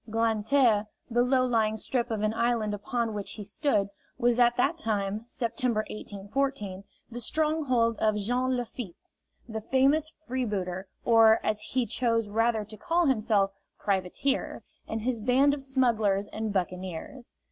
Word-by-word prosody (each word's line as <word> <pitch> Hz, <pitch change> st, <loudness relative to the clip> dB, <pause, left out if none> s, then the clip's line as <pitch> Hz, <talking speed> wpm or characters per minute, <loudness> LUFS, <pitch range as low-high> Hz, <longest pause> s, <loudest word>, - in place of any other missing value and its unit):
Grand 225 Hz, -1 st, 0 dB
Terre, 230 Hz, -7 st, +4 dB, 0.2 s
the 240 Hz, +1 st, +3 dB
low 255 Hz, +1 st, +3 dB
lying 220 Hz, -3 st, +1 dB
strip 245 Hz, +2 st, -1 dB
of 220 Hz, -2 st, -2 dB
an 215 Hz, 0 st, +1 dB
island 230 Hz, -2 st, 0 dB
upon 225 Hz, +2 st, -2 dB
which 205 Hz, -1 st, -5 dB
he 210 Hz, -, -7 dB
stood, 205 Hz, 0 st, 0 dB, 0.3 s
was 245 Hz, -1 st, +2 dB
at 240 Hz, 0 st, +4 dB
that 275 Hz, +6 st, +2 dB
time 210 Hz, -3 st, -1 dB
September, 235 Hz, -2 st, -1 dB
1814 205 Hz, -1 st, -3 dB, 0.3 s
the 240 Hz, -, -5 dB
stronghold 255 Hz, -4 st, +1 dB
of 215 Hz, -1 st, +2 dB
Jean 250 Hz, +5 st, 0 dB
Lafitte, 235 Hz, -6 st, -5 dB, 0.5 s
the 220 Hz, -1 st, -5 dB
famous 275 Hz, +6 st, +2 dB, 0.2 s
freebooter, 200 Hz, -7 st, -2 dB, 0.2 s
or, 225 Hz, -1 st, +6 dB
as 215 Hz, 0 st, +1 dB
he 250 Hz, +3 st, -1 dB
chose 230 Hz, -1 st, 0 dB
rather 225 Hz, 0 st, +1 dB
to 215 Hz, +1 st, -10 dB
call 345 Hz, +3 st, +1 dB
himself, 215 Hz, -7 st, +2 dB, 0.3 s
privateer, 200 Hz, +8 st, -1 dB, 0.2 s
and 220 Hz, 0 st, -3 dB
his 245 Hz, -1 st, -1 dB
band 260 Hz, +5 st, +4 dB
of 285 Hz, -, -4 dB
smugglers 225 Hz, -7 st, +1 dB
and 220 Hz, -1 st, -2 dB
buccaneers. 185 Hz, +5 st, -4 dB
230 Hz, 145 wpm, -28 LUFS, 210-255 Hz, 0.5 s, or